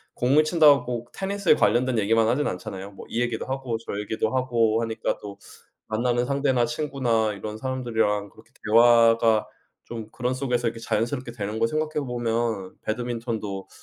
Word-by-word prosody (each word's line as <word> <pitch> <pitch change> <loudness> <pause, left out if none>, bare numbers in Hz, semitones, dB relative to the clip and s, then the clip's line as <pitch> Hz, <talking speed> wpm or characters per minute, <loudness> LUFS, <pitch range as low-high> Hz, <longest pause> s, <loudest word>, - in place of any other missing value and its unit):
공을 140 +5 +3
친다고 140 -7 +3
테니스에 195 -4 +1
관련된 125 -2 +2
얘기만 110 +2 +3
하진 140 +6 +1
않잖아요. 95 +2 -6
뭐 95 - -11
이 120 - -1
얘기도 120 -2 -2
하고 130 -3 -3
저 - - -4
얘기도 110 +3 -2
하고 115 -3 +2
하니까 115 -1 -2
또 100 -1 -8 0.5
만나는 120 +2 0
상대나 135 -3 +1
친구나 130 -8 0
이런 105 +2 -6
사람들이랑 110 -5 -1
그렇게 - - -20
대화가 115 -1 +5 0.4
좀 115 -2 -7
그런 125 +2 -2
속에서 125 -2 -1
이렇게 115 0 -2
자연스럽게 120 +3 -2
되는 110 -1 -5
거 115 - +3
생각해 155 0 -2
보면 115 -5 -2
배드민턴도 115 -4 -4
120 Hz, 380 characters per minute, -25 LUFS, 110-130 Hz, 0.5 s, 대화가